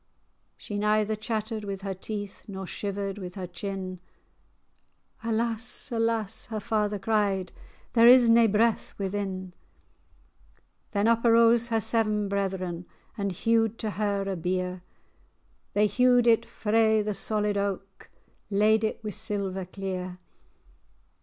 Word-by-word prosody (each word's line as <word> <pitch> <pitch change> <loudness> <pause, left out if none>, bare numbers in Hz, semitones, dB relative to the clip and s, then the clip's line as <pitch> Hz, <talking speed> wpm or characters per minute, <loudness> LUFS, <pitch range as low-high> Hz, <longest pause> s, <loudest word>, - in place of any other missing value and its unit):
She 205 -1 -5
neither 215 +1 +2
chattered 215 0 -3
with 195 -1 -5
her 195 -1 -2
teeth, 205 +1 -6
Nor 190 -2 -6
shivered 200 +1 -4
with 180 -2 -7
her 190 -2 -4
chin; 185 0 -5 1.2
"Alas! 230 +1 -2
alas!" 225 -3 -1
her 220 -1 -3
father 210 -1 0
cried, 195 -3 0 0.4
"There 230 -1 +7
is 245 -1 +8
nae 230 0 +6
breath 220 +2 +1
within." 190 -2 -3 1.4
Then 205 0 +1
up 230 0 +3
arose 230 0 +5
her 225 -1 +1
seven 215 -1 +1
brethren, 185 -3 -2 0.3
And 200 -3 -2
hewed 225 +3 +1
to 215 - -3
her 200 -1 -1
a 195 -1 -2
bier; 180 +1 -2 0.9
They 210 +1 +4
hewed 245 +3 +4
it 230 0 +4
frae 220 0 +2
the 210 0 -2
solid 210 0 0
aik,[#] 195 -1 -3 0.4
Laid 215 +2 +3
it 220 - 0
o'er - - -29
wi' 215 - -3
silver 200 -3 -2
clear. 185 -1 -5
210 Hz, 130 wpm, -27 LUFS, 195-225 Hz, 1.4 s, is